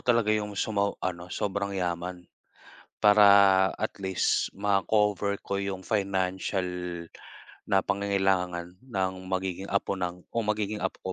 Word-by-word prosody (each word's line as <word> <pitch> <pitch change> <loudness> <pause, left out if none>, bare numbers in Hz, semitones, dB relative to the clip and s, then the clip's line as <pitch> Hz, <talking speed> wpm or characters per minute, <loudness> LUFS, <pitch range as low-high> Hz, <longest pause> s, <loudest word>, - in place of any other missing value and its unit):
talaga 115 -3 +3
'yong 105 -2 -2
sumo 100 -1 0
ano, 90 -1 -3
sobrang 100 +1 -2
yaman. 90 0 -3 0.8
Para 105 0 +7 0.5
at 110 - -2
least 95 -1 +1
ma-cover 100 0 +1
ko 100 0 -1
'yong 95 -1 -4
financial 95 -2 -1 1.0
na 95 -2 +4
pangangailangan 95 -3 0
ng 95 -6 -1 0.2
magiging 95 0 -3
apo 100 0 0
ng 90 -1 -4
o - - -3
magiging 105 -1 -1
apo 95 - -2
100 Hz, 120 wpm, -28 LUFS, 95-105 Hz, 1.0 s, Para